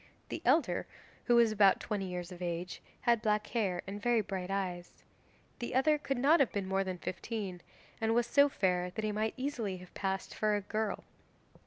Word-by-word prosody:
The - - -4
elder, - - +2 0.4
who 240 - +4
was 235 -2 +5
about 200 -2 +5
twenty 205 -4 -3
years 180 -1 -5
of 180 0 -10
age, 175 0 -4 0.2
had 235 -2 +3
black 210 -1 +1
hair 195 -7 -1
and 200 +2 -6
very 240 0 +3
bright 190 -2 -4
eyes. 185 -3 -4 0.6
The 240 - -4
other 300 +3 +4
could 275 -2 -2
not 290 +7 +5
have 275 - +3
been 200 -2 -2
more 195 0 +1
than 185 -1 -4
fifteen, 190 -1 -5 0.4
and 225 0 +2
was 240 0 +3
so 285 +4 +5
fair 180 -6 0
that 215 +4 -5
he 215 - 0
might 215 +1 -1
easily 245 -8 -2
have 180 0 -13
passed 195 -1 -3
for 215 -1 +1
a 205 - -1
girl. 215 +1 -2
205 Hz, 195 wpm, -32 LUFS, 185-235 Hz, 0.6 s, was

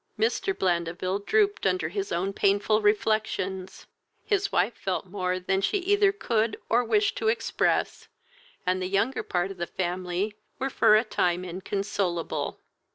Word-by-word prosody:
Mr. 230 - +1
Blandeville 175 +1 0
drooped 410 - +2
under 185 -4 +1
his 195 +2 -3
own 185 +4 -1
painful 205 +2 +2
reflections, 205 -3 0 0.4
his 400 -2 +1
wife 195 +7 +2
felt 190 -1 -3
more 185 -1 -2
than 190 +1 0
she 300 - +1
either 400 +1 +3
could 230 - 0
or 240 +2 +3
wished 410 - +2
to 440 - -1
express, 455 +1 0 0.6
and 185 +1 +1
the 185 - -1
younger 200 +7 +1
part 180 +2 -1
of 195 - -9
the 175 0 -3
family 180 +2 -2 0.2
were 270 +1 -2
for 215 - +5
a 215 - +4
time 180 -5 0
inconsolable. 180 -4 -2
195 Hz, 150 wpm, -27 LUFS, 180-225 Hz, 0.6 s, for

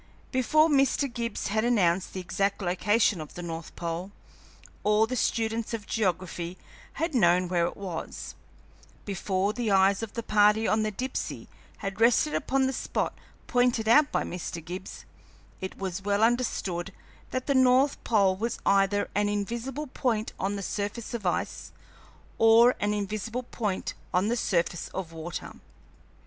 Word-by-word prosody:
Before 305 +5 +4
Mr. 280 -1 +3
Gibbs 235 -4 -3
had 220 +2 +1
announced 190 -7 +2
the 190 - -4
exact 195 +2 -1
location 200 +1 +2
of 155 - -10
the 175 - -6
north 165 -1 -6
pole, 170 +2 -4 0.7
all 210 +1 +4
the 250 +3 -3
students 225 -1 0
of 210 -2 -7
geography 180 -4 -2 0.4
had 325 -1 -2
known 180 -6 +4
where 175 -1 +1
it - - -7
was; 185 -5 -6 0.7
before 195 0 -1
the 235 -2 -2
eyes 195 +1 +4
of 225 -2 -5
the 230 - -4
party 210 +1 +4
on 215 +1 +2
the 215 - 0
Dipsey 255 +6 -4 0.4
had 195 +2 -4
rested 245 +6 +4
upon 270 0 +1
the 265 - 0
spot - - -2 0.3
pointed 245 -3 +2
out 290 +6 +5
by - - +1
Mr. 170 -2 -6
Gibbs, 185 +2 -7 0.6
it 190 - -5
was 190 -1 -4
well 205 +2 +1
understood 200 -7 0 0.4
that 255 0 -3
the 280 - +1
north 260 +1 +4
pole 200 -5 +3
was 225 +4 -2
either 200 +1 +3
an 205 +1 +1
invisible 235 +8 -3
point 235 -5 -1
on 200 +2 -1
the 200 - -4
surface 205 +5 -4
of 215 -6 -2
ice 175 - -2 0.7
or 230 +2 +7
an 210 0 0
invisible 215 +4 -3
point 210 -5 -3 0.2
on 185 +4 +2
the 240 - +1
surface 175 -6 0
of 185 -4 -4
water. 165 +1 -6
210 Hz, 155 wpm, -28 LUFS, 185-235 Hz, 0.7 s, or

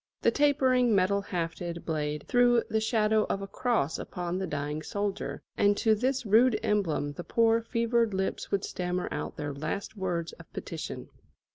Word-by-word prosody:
The - - +5
tapering 260 -5 +3
metal 200 +1 +3
hafted 170 -2 -4
blade 150 -2 -2
threw 245 -1 +4
the 220 0 0
shadow 220 -1 +2
of 195 - -1
a - - -5
cross 200 - 0
upon 180 +1 -4
the 190 - -2
dying 150 0 -3
soldier, 200 +4 -3
and 205 0 +3
to 220 -2 +3
this 255 +4 0
rude 220 +2 +5
emblem 160 -8 0
the 175 - -7
poor 230 +5 +3
fevered 230 0 +1
lips 190 0 -2
would 200 0 0
stammer 180 0 -2
out - - -4
their 145 -1 -3
last 155 +9 -4
words 175 -4 -2
of - - -14
petition. - - -6
200 Hz, 165 wpm, -29 LUFS, 170-230 Hz, -, The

